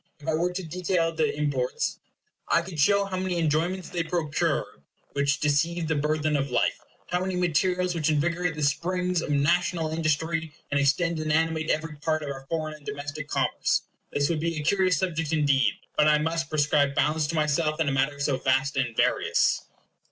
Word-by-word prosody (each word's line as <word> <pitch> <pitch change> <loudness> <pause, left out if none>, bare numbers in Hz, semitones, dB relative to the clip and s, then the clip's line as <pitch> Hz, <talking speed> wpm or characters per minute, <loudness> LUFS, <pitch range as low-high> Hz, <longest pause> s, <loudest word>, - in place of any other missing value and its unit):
If 150 - -13
I 160 - +1
were 170 +3 +1
to 185 +1 -4
detail 170 0 0
the 160 -1 +1
imports, 140 -4 -1 0.5
I 170 - +3
could 170 -3 -7
show 200 +6 +4
how 190 -1 -4
many 185 -1 -1
enjoyments 170 +3 0
they 175 - -2
procure 165 -3 -1 0.3
which 140 0 +1
deceive 160 +3 +1
the 160 - +1
burthen 155 +1 0
of 140 -1 0
life; 125 - +1 0.3
how 180 - +1
many 185 0 -2
materials 180 +1 +1
which 160 -2 0
invigorate 170 +3 0
the 150 - -3
springs 180 +4 0
of - - -5
national 165 +3 +1
industry, 160 0 -1 0.2
and 145 - +2
extend 160 +4 +1
and 155 0 -1
animate 160 0 +1
every 155 0 -1
part 155 +1 -1
of 145 - -5
our 135 0 -9
foreign 155 -2 -2
and 150 -1 -13
domestic 145 +1 -5
commerce. - - 0 0.3
This 145 0 +1
would 165 -2 -1
be 165 0 -1
a 150 - -3
curious 185 0 +2
subject 165 -4 -1
indeed; 140 -3 +3 0.2
but 150 - +4
I 150 0 +5
must 160 0 -1
prescribe 145 -2 +2
bounds 155 0 +1
to 165 - -3
myself 155 0 +1
in 160 - +1
a - - +2
matter 135 +2 0
so 140 -2 +1
vast 135 +2 +1
and 125 -4 -1
various. - - +2
155 Hz, 190 wpm, -26 LUFS, 145-170 Hz, 0.5 s, I